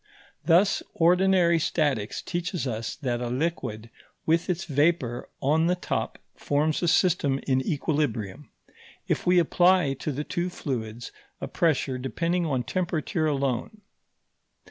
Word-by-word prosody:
Thus, 180 +4 +4
ordinary 175 0 +4
statics 145 -10 -1
teaches 175 -2 -3
us 115 -3 -3
that 125 -5 -2
a 120 - -2
liquid 120 -6 -3 0.3
with 165 +3 +1
its 180 +1 -1
vapour 145 -5 0
on 155 +4 +3
the 180 - +2
top 180 - -3 0.2
forms 150 +2 0
a 175 - +1
system 160 -6 +2
in 130 -1 +2
equilibrium, 140 -4 -2 0.6
if - - -1
we 180 0 +5
apply 175 -2 +4
to 135 +3 -4
the 145 +2 -3
two 175 +3 -2
fluids 120 -8 -5 0.3
a - - -4
pressure 140 -5 0
depending 170 +6 -1
on 130 -4 0
temperature 170 -1 -1
alone. 140 - -2
155 Hz, 130 wpm, -26 LUFS, 130-175 Hz, 0.6 s, we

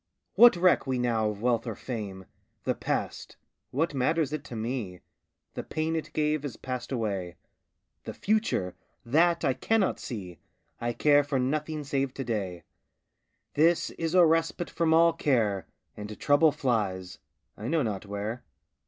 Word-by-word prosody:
What 240 -3 +8
reck 175 -4 +3
we 130 -1 0
now 115 -3 +1
of 105 +1 -6
wealth 120 -1 +1
or 115 - -3
fame? 100 -7 -6 0.4
The - - +1
past - - -3 0.3
what 155 +4 0
matters 150 +3 +1
it 155 -2 -3
to 120 - -8
me? 110 - -4 0.5
The - - -4
pain 160 +1 -2
it 155 -2 -4
gave 150 -1 +1
has 140 -4 -6
passed 130 0 -5
away. 100 -8 -2 0.7
The - - -5
future 210 - 0 0.3
that 165 +6 +3
I 135 - +3
cannot 205 - +1
see! 95 -8 -7 0.4
I 120 +1 -1
care 145 +3 +4
for 140 -1 -1
nothing 150 +4 -1
save 135 -2 -1
to 135 - -3
day 100 -7 -3 0.9
This 165 +3 +3
is 165 +1 -3
a 180 -2 +8
respite 165 +1 +1
from 165 -1 +1
all 165 +1 +5
care, 110 -9 +1 0.3
And 105 0 -8
trouble 150 +2 +4
flies 95 -9 -2 0.4
I 110 - -6
know 155 +1 +1
not 105 -4 -3
where. 105 +4 -4
130 Hz, 155 wpm, -28 LUFS, 110-155 Hz, 0.9 s, What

